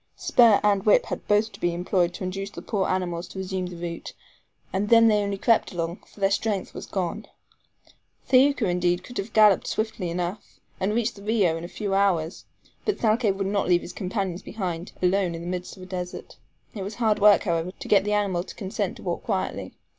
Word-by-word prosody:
Spur 230 -4 +5
and 200 -2 +3
whip 210 - +4
had - - -6
both 210 +2 +2
to - - -13
be 175 -1 0
employed 175 0 +1
to - - -6
induce 195 +2 -4
the - - -10
poor 195 -3 -1
animals 175 -2 -2
to - - -11
resume 190 -1 -3
the 180 - -8
route, 170 0 -6 0.6
and 200 +2 -1
then 230 -1 +7
they 210 -2 +4
only 200 -1 -2
crept 230 +3 +2
along, 170 0 -3
for - - -18
their 195 0 +2
strength 205 -2 -1
was - - -8
gone. 190 +2 -3 1.0
Thaouka, 260 -3 +4
indeed, 175 0 +1
could 245 - -7
have 200 +3 -4
galloped 215 -3 +5
swiftly 215 -5 -2
enough, 175 +4 -5 0.2
and 205 +3 0
reached 235 -2 0
the - - -11
RIO 205 -6 +2
in 165 - -6
a - - -5
few 200 +2 -4
hours, 185 -4 +1 0.4
but 420 - 0
Thalcave 220 -2 +2
would 195 0 -2
not 200 0 0
leave 175 -1 +4
his 180 - -8
companions 190 -2 -3
behind, 180 -5 -5
alone 180 -1 +2
in 165 - -6
the 170 - -7
midst 180 +2 -5
of 185 - -10
a - - -8
desert. 180 -1 -6 0.4
It 210 - -6
was 200 +3 -5
hard 220 -2 +1
work, 205 0 +6
however, 170 -1 -1
to - - -10
get 200 -2 +5
the 210 +1 -1
animal 195 -4 +1
to - - -10
consent 195 0 -3
to - - -12
walk - - -2
quietly. - - -3
195 Hz, 215 wpm, -25 LUFS, 180-210 Hz, 1.0 s, then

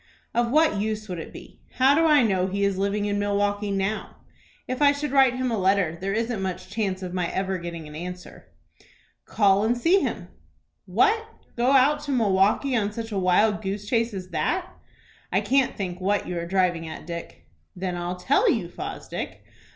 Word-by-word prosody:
"Of 235 0 +1
what 305 -6 +3
use 215 0 -3
would 180 -3 -5
it - - -8
be? - - -13 0.2
How 265 +2 +5
do 325 +3 +3
I 295 -4 +5
know 190 -4 +1
he 200 +1 -2
is 195 -1 0
living 200 +1 0
in 205 0 -1
Milkwaukie 205 0 0
now? 195 +2 -2 0.5
If 255 +2 -3
I 285 0 +6
should 290 0 -4
write 265 -3 +5
him 255 -1 -1
a 225 - 0
letter, 190 -3 +2
there 195 +1 -2
isn't 225 0 -1
much 185 0 -5
chance 195 -3 -2
of 180 -1 -5
my 180 -2 -1
ever 190 -1 -2
getting 170 -2 -7
an 150 - -11
answer." 180 +2 -8 0.8
"Call 200 -1 +3
and 235 +2 +1
see 340 +10 +4
him." - - -3 0.6
"What, 435 +2 +2 0.3
go 245 +1 +2
out 280 +3 +5
to 285 - -3
Milwaukie 215 +3 +2
on 210 -3 0
such 225 +1 -6
a 200 - -1
wild 195 +4 +3
goose 200 +1 -4
chase 230 +1 +1
as 185 -1 -6
that? 185 - -1 0.6
I - - +3
can't 270 -1 +1
think 185 -2 -4
what 200 +2 0
you 180 - -4
are 170 - -5
driving 175 -3 +1
at, 160 - -8
Dick." 170 0 -8 0.3
"Then 180 -1 -3
I'll 175 +1 -3
tell 280 - +2
you, - - 0
Fosdick. - - -6
205 Hz, 195 wpm, -25 LUFS, 185-240 Hz, 0.8 s, I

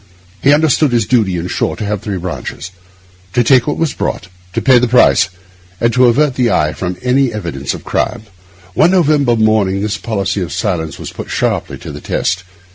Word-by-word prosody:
He 140 - +4
understood 150 -1 +3
his 115 -3 +2
duty, 105 -8 +1
in 85 +1 -3
short, - - -2
to 110 - -4
have 105 -1 -2
three 105 -3 -4
branches: 90 0 -6 0.6
to 120 - +3
take 125 0 +4
what 145 - -1
was 160 -5 0
brought, 90 - -4 0.2
to - - 0
pay 130 -2 +5
the 125 - +1
price, 120 -6 +4 0.5
and 115 0 +1
to 125 0 +5
avert 135 +4 +3
the 125 -2 +1
eye 75 -7 +1
from 90 -1 -4
any 130 0 +2
evidence 85 -11 -4
of - - -10
crime. - - -2 0.5
One 160 - +4
November 150 -9 +3
morning 110 -3 +2
this 105 0 -2
policy 100 -3 -2
of 85 - -4
silence 85 -7 -2
was - - -7
put - - -8
sharply - - -1
to - - -9
the - - -9
test. 95 +1 -1
115 Hz, 200 wpm, -15 LUFS, 95-130 Hz, 0.6 s, pay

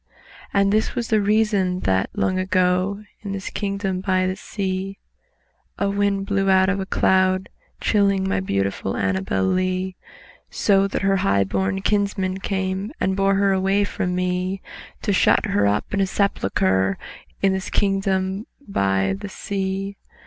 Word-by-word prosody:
And 200 0 +3
this 215 +1 +1
was 235 -2 -2
the 215 -2 +3
reason 205 -3 +2
that, 95 -1 +1
long 185 0 0
ago, 185 +2 +1 0.2
In 200 -2 -5
this 195 -1 -5
kingdom 195 -2 -2
by 185 -1 +1
the 185 0 -1
sea, 195 -1 -4 0.8
A 200 0 0
wind 200 -1 0
blew 195 -1 +1
out 190 0 +5
of 195 0 0
a 190 - -4
cloud 185 0 +3
by - - -20
night - - -38
Chilling 200 -2 +2
my - - 0
ANNABEL 95 -1 -1
LEE; 185 - 0 0.5
So 195 -1 +3
that 195 - -3
her 195 0 +3
high 100 - +2
born 95 0 -1
kinsmen 200 -2 0
came 190 +1 -2
And 190 0 +1
bore 195 0 +2
her 195 0 +3
away 195 +2 +2
from 180 -2 -2
me, 180 +1 -1 0.4
To - - +1
shut - - +4
her 100 0 +2
up, 105 - -1
in 200 - +2
a 195 - +2
sepulchre 95 - +1 0.5
In 195 -1 +4
this 190 0 -3
kingdom 195 0 0 0.2
by 95 - +1
the 145 - -7
sea. 195 0 -3
190 Hz, 155 wpm, -22 LUFS, 180-200 Hz, 0.8 s, out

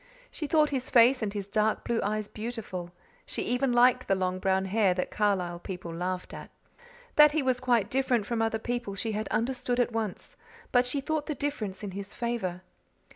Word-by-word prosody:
She 305 - -4
thought 300 0 +3
his 260 -2 -2
face 245 +2 +6
and 210 -2 -1
his 200 -1 -4
dark 215 +1 +1
blue 235 -1 0
eyes 215 0 -1
beautiful; 215 -6 -6 0.3
she - - -3
even 250 +2 +1
liked 250 +1 +4
the 195 - +3
long 185 0 -1
brown 190 0 +1
hair 195 -1 +2
that 180 - -2
Carlisle 185 -5 0
people 180 -2 -6
laughed 180 +2 -3
at. - - -8 0.7
That 300 -1 +8
he 310 -2 +1
was 255 -1 +1
quite 245 -4 +2
different 255 -5 +1
from 230 +1 -1
other 225 0 +1
people 240 -3 -3
she 220 +3 -2
had 215 +1 -2
understood 245 +1 -1
at 240 -1 +2
once, 220 -4 -4 0.3
but 245 0 +4
she 275 +2 -1
thought 300 +1 -2
the 305 - -2
difference 230 -10 -3
in 200 - -4
his 195 +1 -6
favour. 210 -7 -3
225 Hz, 195 wpm, -28 LUFS, 195-250 Hz, 0.7 s, That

